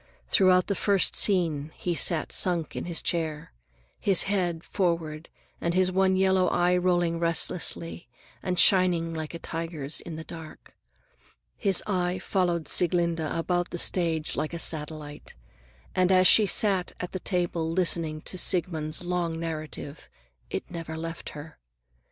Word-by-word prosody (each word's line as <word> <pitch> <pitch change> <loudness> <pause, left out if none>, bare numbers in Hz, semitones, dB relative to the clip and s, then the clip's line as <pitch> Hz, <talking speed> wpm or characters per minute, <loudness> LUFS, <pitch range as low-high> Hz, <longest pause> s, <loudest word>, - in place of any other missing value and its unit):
Throughout 185 -1 +4
the 200 - -1
first 200 0 +2
scene 165 -7 +2
he 175 - -2
sat 165 -1 +2
sunk 175 -4 +1
in - - -4
his 170 -1 -2
chair, 155 - -2 0.5
his 195 -3 +4
head 180 -4 -1
forward 165 -4 -2 0.3
and 170 +1 -1
his 185 0 +3
one 190 0 +2
yellow 190 -1 +3
eye 175 +1 +2
rolling 175 -2 +1
restlessly 170 -3 -1 0.3
and 180 -1 -2
shining 175 -3 +4
like 160 0 -5
a - - -3
tiger's 165 -3 -3
in 165 - -8
the 160 - -7
dark. 160 -1 -11 0.8
His 195 -3 +2
eye 180 -2 0
followed 175 -4 -1
Sieglinde 170 -1 +2
about 165 +3 -1
the - - -5
stage 165 -3 0
like 155 +2 -3
a - - -3
satellite, 150 -2 -6 0.6
and 185 0 +2
as 185 0 +5
she 210 +2 +6
sat 195 -3 +2
at 180 - -5
the 185 - -4
table 175 -3 -1
listening 165 -3 0
to 185 - -2
Siegmund's 165 -3 +1
long 175 -2 -2
narrative, 155 -2 -6 0.4
it - - -3
never 165 -2 -6
left 165 +1 -6
her. 150 +2 -11
170 Hz, 145 wpm, -27 LUFS, 160-180 Hz, 0.8 s, she